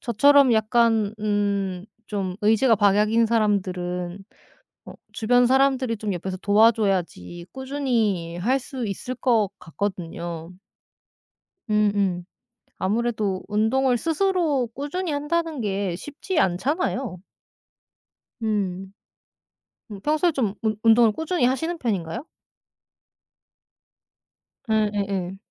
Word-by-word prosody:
저처럼 275 +3 +5
약간 220 -1 +2
음 200 -3 -1 0.3
좀 190 -3 -3
의지가 225 +3 +4
박약인 210 +3 +3
사람들은 185 -4 -1 0.9
주변 245 +2 +3
사람들이 260 -3 +2
좀 205 -2 -2
옆에서 185 +2 -5
도와줘야지 195 - +1
꾸준히 235 -11 -1
할 245 +9 +1
수 265 -2 -6
있을 210 +5 -4
것 230 -6 +2
같거든요. 170 -2 -5 1.2
음음. 200 -4 +1 0.5
아무래도 210 -2 -1
운동을 240 +5 +2
스스로 325 - +1
꾸준히 305 +6 -3
한다는 305 0 -1
게 195 -4 -2
쉽지 300 - -4
않잖아요. 250 - -1 1.2
음. 195 -3 -2 1.0
음 200 -2 -8
평소에 310 - +1
좀 230 -9 -1
운 215 -1 0
운동을 225 0 +5
꾸준히 320 - -1
하시는 320 +7 0
편인가요? 200 - -3 2.5
예예예. 200 -4 -1
215 Hz, 215 characters per minute, -24 LUFS, 195-260 Hz, 2.5 s, 저처럼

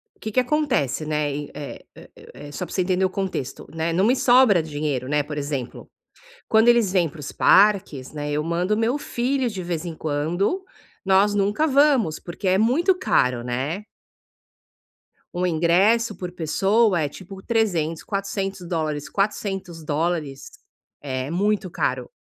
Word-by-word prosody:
o - - -33
que 220 - -5
que 255 - +2
acontece, 250 - 0
né, 150 -2 -1 0.2
eh 145 - -7 0.2
eh - - -14
eh - - -15
eh, 145 0 -10
só 180 - -4
para - - -11
você 185 - +2
entender 185 +1 +1
o - - +1
contexto, 185 -9 -4
né. 160 +1 -1
Não 190 +4 +2
me 250 +3 +4
sobra 245 -9 +5
dinheiro, 145 -4 -3
né, 150 0 +1
por 150 0 -7
exemplo, 140 -4 -4 0.6
quando 220 +1 +4
eles 235 -5 +4
vêm 180 -3 +2
para 160 - -14
os 140 - -6
parques, 195 -10 +3
né, 150 -1 -4
eu 150 +1 0
mando 175 +5 0
o - - -2
meu 230 +5 +1
filho, 255 -2 -1
de 190 -4 -6
vez 175 -1 -3
em 165 -2 -5
quando, 165 - -1 0.4
nós 195 +2 +4
nunca 205 +9 +1
vamos, 275 - +3
porque 185 +3 -6
é 185 +1 +4
muito 280 - +3
caro, 125 - +1
né. 135 +11 -3 1.5
Um 180 +1 -1
ingresso 190 +7 +2
por 180 -1 -6
pessoa 190 +3 +2
é 145 - -1
tipo 190 +4 -11
300, 180 -9 0
400 195 -2 -3
dólares, 155 -4 -2
400 195 -4 -2
dólares 150 -2 -2 0.5
é 130 -1 -4
muito 200 +2 0
caro. - - -2
180 Hz, 165 wpm, -23 LUFS, 155-210 Hz, 1.5 s, sobra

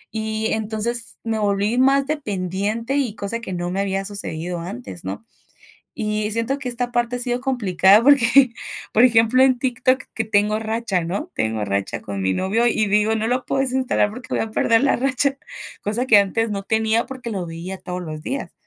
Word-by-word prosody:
Y, 220 0 -1
entonces 220 +2 -1
me 225 -1 -2
volví 205 +2 0
más 275 +1 +4
dependiente, 215 - -2
y 245 -7 -1
cosa 230 +3 -3
que 190 - -7
no 175 0 -3
me 195 +1 -1
había 195 0 -2
sucedido 175 -4 -4
antes, 120 - -8
¿no? 95 - -6 0.7
Y 215 -3 -2
siento 230 +5 -1
que 255 - -5
esta 245 0 -2
parte 240 0 0
ha - - -6
sido 245 0 -1
complicada 210 -5 +4
porque, 265 -2 +5 0.4
por 225 - +5
ejemplo, 230 +1 +4
en 260 -2 +4
TikTok 255 0 +1
que 225 - -2
tengo 210 0 +1
racha, 220 -4 -1
¿no?, 200 - -4
tengo 110 -1 -1
racha 100 0 -2
con 100 -2 -5
mi 95 0 +1
novio 220 - +1
y 215 -2 +1
digo: 210 +2 +2
"No 220 0 -1
lo 250 +2 -1
puedo 270 - 0
desinstalar 260 -5 +1
porque 250 +3 -10
voy - - 0
a 220 - -4
perder 230 +2 +2
la 280 - +3
racha", 275 +2 +1 0.4
cosa 220 +5 -1
que 215 - +7
antes 215 +3 +1
no 200 -1 -3
tenía 220 +2 +1
porque 255 -3 -7
lo 190 -4 -3
veía 170 +3 -6
todos 180 0 -5
los 155 -2 -7
días. 275 +2 -4
220 Hz, 195 wpm, -21 LUFS, 195-245 Hz, 0.7 s, que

